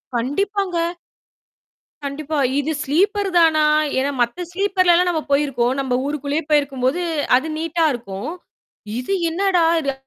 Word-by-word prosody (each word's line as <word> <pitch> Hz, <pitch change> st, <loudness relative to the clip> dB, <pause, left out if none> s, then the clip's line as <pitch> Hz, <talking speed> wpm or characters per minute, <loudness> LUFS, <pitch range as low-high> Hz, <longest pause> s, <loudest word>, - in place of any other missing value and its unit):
கண்டிப்பாங்க. 365 Hz, -, -1 dB, 1.3 s
கண்டிப்பா. 295 Hz, +2 st, -4 dB, 0.2 s
இது 295 Hz, +3 st, -1 dB
ஸ்லீப்பர் 395 Hz, +7 st, +1 dB
தானா? 320 Hz, -2 st, +4 dB, 0.4 s
ஏன்னா 275 Hz, +2 st, 0 dB
மத்த 240 Hz, +10 st, -1 dB
ஸ்லீப்பர்லலாம் 365 Hz, -2 st, +3 dB
நம்ம 320 Hz, -3 st, 0 dB
போயிருக்கோம் 270 Hz, -4 st, +1 dB
நம்ப 260 Hz, -2 st, -2 dB
ஊருக்குள்ளேயே 290 Hz, +2 st, -2 dB
போயிருக்கும்போது, 280 Hz, +1 st, +1 dB, 0.4 s
அது 275 Hz, +5 st, -3 dB
நீட்டா 330 Hz, +1 st, 0 dB
இருக்கும். 205 Hz, -2 st, -6 dB, 0.7 s
இது 255 Hz, +10 st, -3 dB, 0.2 s
என்னடா? 365 Hz, 0 st, +1 dB, 0.2 s
இது? 275 Hz, -2 st, -1 dB
310 Hz, 115 wpm, -20 LUFS, 275-355 Hz, 1.3 s, தானா